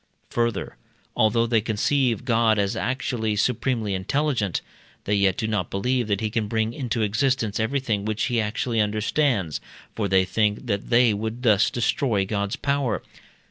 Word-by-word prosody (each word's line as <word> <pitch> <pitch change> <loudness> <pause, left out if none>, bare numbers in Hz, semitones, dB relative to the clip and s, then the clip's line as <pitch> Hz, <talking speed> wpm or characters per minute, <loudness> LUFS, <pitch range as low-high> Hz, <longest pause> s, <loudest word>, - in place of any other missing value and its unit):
Further, 115 -3 -1 0.4
although 110 +2 +3
they 115 -2 +2
conceive 120 +2 0
God 115 -3 +3
as 100 -1 0
actually 120 -3 -1
supremely 110 -1 0
intelligent, 115 - 0 0.4
they 105 - -1
yet 100 -2 +2
do - - -1
not 100 -6 -1
believe 125 +4 0
that 100 -1 0
he 110 -1 -1
can 110 -1 -1
bring 110 +1 -1
into 120 -4 -2
existence 110 0 0
everything 110 -3 0
which 110 -2 -2
he 120 +1 +1
actually 110 +2 -1
understands, 105 - 0 0.3
for 105 -3 -1
they 95 -1 +3
think 105 +4 0
that 100 -4 -2
they 120 -2 +5
would 110 +4 -4
thus 105 -5 +4
destroy 115 -3 0
God's 100 0 -2
power. 140 -5 -1
110 Hz, 155 wpm, -24 LUFS, 105-120 Hz, 0.4 s, they